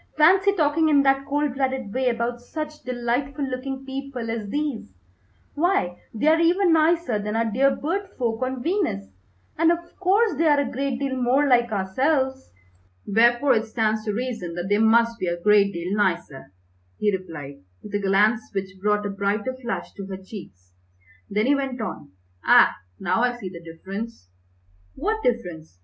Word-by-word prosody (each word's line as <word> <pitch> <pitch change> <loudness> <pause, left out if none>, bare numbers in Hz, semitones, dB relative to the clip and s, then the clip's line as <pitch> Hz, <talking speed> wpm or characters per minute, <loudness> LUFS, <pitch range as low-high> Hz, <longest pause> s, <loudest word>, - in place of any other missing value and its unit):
Fancy 380 +6 +5
talking 315 -2 +2
in 285 -2 +5
that 270 0 +2
cold 290 -1 0
blooded 265 -5 -2
way 260 0 +1
about 235 0 -2
such 305 +4 -6
delightful 255 +4 -2
looking 265 +1 -5
people 265 -4 -5
as 220 -3 -4
these, 285 - -3 0.6
why, 295 - +1 0.2
they 225 +5 -3
are 320 +1 +5
even 345 +1 +3
nicer 320 -7 +2
than 210 +1 -3
our 230 0 +1
dear 265 +5 +2
bird 380 +7 -3
folk 230 -2 -1
on 255 -1 -2
Venus, 335 - -1 0.5
and 330 0 +5
of 340 - +2 0.2
course 395 +4 +3
they 330 - +3
are 295 -1 +4
a 280 - -1
great 270 0 -2
deal 270 0 -2
more 260 +3 +2
like 240 -3 +3
ourselves." 265 +7 0 0.5
"Wherefore 240 +5 +4
it 220 -1 +1
stands 220 -1 0
to 210 - 0
reason 220 -7 -4
that 175 +2 -4
they 205 +1 +3
must 230 +1 +3
be 185 - -2
a 175 0 -2
great 205 +1 +4
deal 180 +2 -3
nicer!" 170 - -1 0.5
he 210 -2 +1
replied, 160 -7 -8 0.3
with 210 - -10
a 205 - +1
glance 205 +3 +3
which 190 -1 -4
brought 210 0 +1
a - - -1
brighter 200 +5 -1
flush 255 -2 -5
to 195 -2 -8
her 190 -1 -5
cheeks. 175 - -12 0.6
Then 210 +2 +1
he 280 - +4
went 270 -2 -2
on, 215 - -6 0.3
"Ah, - - +6 0.2
now 185 +4 0
I 245 0 +1
see 195 -6 -6
the 170 -2 -10
difference." 190 - -8 0.6
"What 430 +9 -1
difference? 175 - -3
240 Hz, 175 wpm, -24 LUFS, 205-280 Hz, 0.6 s, Ah